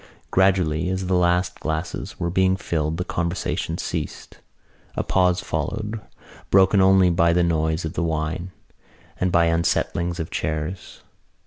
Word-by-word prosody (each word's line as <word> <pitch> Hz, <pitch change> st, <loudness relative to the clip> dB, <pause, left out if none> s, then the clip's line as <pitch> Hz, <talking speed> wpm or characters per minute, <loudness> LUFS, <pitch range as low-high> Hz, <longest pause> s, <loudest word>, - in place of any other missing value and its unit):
Gradually 90 Hz, -3 st, +2 dB
as 95 Hz, 0 st, -2 dB
the 95 Hz, -, -1 dB
last 90 Hz, 0 st, +1 dB
glasses 80 Hz, +2 st, -4 dB
were 85 Hz, 0 st, -1 dB
being 95 Hz, +1 st, +2 dB
filled 80 Hz, -3 st, -2 dB
the 90 Hz, -, -1 dB
conversation 85 Hz, 0 st, -2 dB
ceased. -, -, -5 dB, 0.6 s
A -, -, -1 dB
pause 90 Hz, -1 st, +2 dB
followed, 110 Hz, 0 st, -3 dB, 0.5 s
broken 95 Hz, +1 st, +5 dB
only 95 Hz, -1 st, +5 dB
by 85 Hz, -1 st, +3 dB
the 90 Hz, 0 st, +3 dB
noise 80 Hz, 0 st, 0 dB
of 80 Hz, -, -4 dB
the -, -, -2 dB
wine 80 Hz, +2 st, -2 dB, 0.7 s
and 90 Hz, 0 st, +1 dB
by 85 Hz, -1 st, +4 dB
unsettlings 85 Hz, +1 st, 0 dB
of 80 Hz, -, -4 dB
chairs. 80 Hz, +4 st, -4 dB
85 Hz, 140 wpm, -23 LUFS, 80-95 Hz, 0.7 s, broken